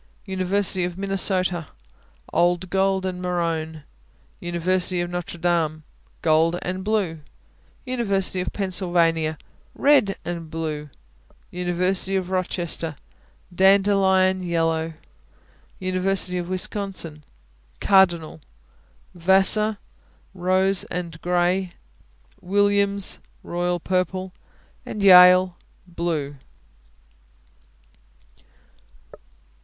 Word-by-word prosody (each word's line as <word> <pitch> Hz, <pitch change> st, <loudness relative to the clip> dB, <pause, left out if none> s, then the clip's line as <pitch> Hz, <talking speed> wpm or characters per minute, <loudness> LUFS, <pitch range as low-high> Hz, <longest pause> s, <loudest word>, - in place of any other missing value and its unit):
University 190 Hz, 0 st, +1 dB
of 175 Hz, 0 st, -4 dB
Minnesota 185 Hz, -4 st, 0 dB, 0.7 s
Old 175 Hz, +1 st, +1 dB
gold 190 Hz, 0 st, +1 dB
and 180 Hz, -1 st, -4 dB
maroon. 165 Hz, -3 st, -3 dB, 0.6 s
University 180 Hz, +1 st, -1 dB
of 175 Hz, 0 st, -3 dB
Notre 175 Hz, -1 st, -5 dB
Dame 165 Hz, -3 st, -1 dB, 0.4 s
Gold 165 Hz, +2 st, +3 dB
and 185 Hz, +1 st, -4 dB
blue. 200 Hz, -6 st, -1 dB, 0.7 s
University 200 Hz, -7 st, -1 dB
of 180 Hz, -, -4 dB
Pennsylvania 175 Hz, -5 st, 0 dB, 0.4 s
Red 275 Hz, -9 st, +3 dB
and 170 Hz, -2 st, -5 dB
blue. 155 Hz, -2 st, -5 dB, 0.6 s
University 180 Hz, +2 st, -1 dB
of 185 Hz, -1 st, -2 dB
Rochester 175 Hz, -3 st, -2 dB, 0.6 s
Dandelion 190 Hz, 0 st, +3 dB
yellow. 165 Hz, -2 st, -1 dB, 0.8 s
University 185 Hz, 0 st, 0 dB
of 175 Hz, 0 st, -6 dB
Wisconsin 185 Hz, -5 st, -2 dB, 0.6 s
Cardinal. 175 Hz, -5 st, +2 dB, 0.7 s
Vassar 195 Hz, +4 st, +3 dB, 0.6 s
Rose 185 Hz, +1 st, +1 dB
and 170 Hz, -2 st, -6 dB
gray. 180 Hz, +1 st, 0 dB, 0.7 s
Williams 200 Hz, +1 st, +1 dB, 0.2 s
Royal 175 Hz, 0 st, -2 dB
purple. 185 Hz, +1 st, -2 dB, 0.5 s
Yale 185 Hz, -2 st, +6 dB, 0.3 s
Blue. 165 Hz, -5 st, -3 dB
180 Hz, 75 wpm, -23 LUFS, 170-190 Hz, 0.8 s, Yale